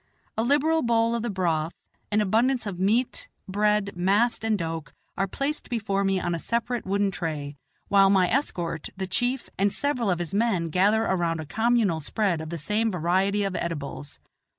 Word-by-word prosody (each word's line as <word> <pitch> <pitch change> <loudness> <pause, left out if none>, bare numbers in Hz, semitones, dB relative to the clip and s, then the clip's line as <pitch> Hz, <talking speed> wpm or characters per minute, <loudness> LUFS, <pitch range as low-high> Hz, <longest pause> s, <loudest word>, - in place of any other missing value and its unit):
A - - 0
liberal 295 +6 +3
bowl 230 -1 +2
of 235 - -1
the 240 - -2
broth, 170 -4 -1 0.4
an 210 +1 +3
abundance 235 +5 +2
of 190 -4 -5
meat, 220 +7 +1 0.2
bread, 210 +1 +1
mast 205 +7 +2
and 220 -1 +1
doke 165 -3 -5 0.2
are 195 - 0
placed 280 +9 -3
before 200 -4 0
me 195 -1 +1
on 175 -1 -1
a 170 - -2
separate 235 +3 -2
wooden 200 0 +1
tray, 150 -5 -4 0.3
while 195 -1 +5
my 190 -2 +4
escort, 175 - -2
the 190 - -2
chief, 245 +7 -1
and 200 +1 +3
several 250 -5 -1
of 180 - +2
his 175 +1 -4
men 200 -6 +1
gather 205 +6 +3
around 170 -5 0
a 160 - -5
communal 220 -2 +1
spread 175 +1 -1
of 160 - -6
the 170 - -4
same 210 +8 0
variety 190 +4 +1
of 195 -2 -2
edibles. 145 -3 -4
200 Hz, 180 wpm, -26 LUFS, 175-230 Hz, 0.4 s, while